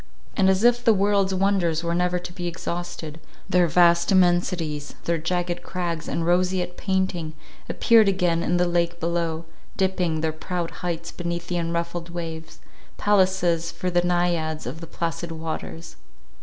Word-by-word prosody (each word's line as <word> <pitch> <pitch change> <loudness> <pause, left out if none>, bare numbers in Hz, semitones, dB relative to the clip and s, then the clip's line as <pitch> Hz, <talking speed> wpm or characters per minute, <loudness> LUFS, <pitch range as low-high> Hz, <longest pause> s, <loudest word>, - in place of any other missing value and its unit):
And, 190 -2 +4
as 190 +2 +2
if 240 0 +4
the 225 -3 +5
world's 195 -1 +2
wonders 185 -4 +1
were 170 0 0
never 180 +1 +1
to 175 0 -7
be 175 -1 -4
exhausted, 170 -2 -5 0.3
their 180 -1 +3
vast 170 +1 +4
immensities, 175 -5 +1
their 170 -1 0
jagged 175 +2 -1
crags, 170 -3 -4
and 165 - -1
roseate 180 +1 +1
painting, 185 -5 -1 0.3
appeared 225 -3 +5
again 175 -3 +1
in 175 - +1
the 180 - +3
lake 170 0 0
below, 165 -1 -1 0.3
dipping 180 -4 0
their 160 -1 0
proud 170 +1 -4
heights 170 -1 -3
beneath 170 0 -4
the 175 - -1
unruffled 170 0 -2
waves—palaces 170 +1 -1
for 180 - -3
the 175 0 +3
Naiads 175 -3 0
of 140 +7 -6
the 165 - -7
placid 170 +1 -3
waters. 155 - -6
175 Hz, 150 wpm, -24 LUFS, 165-180 Hz, 0.3 s, the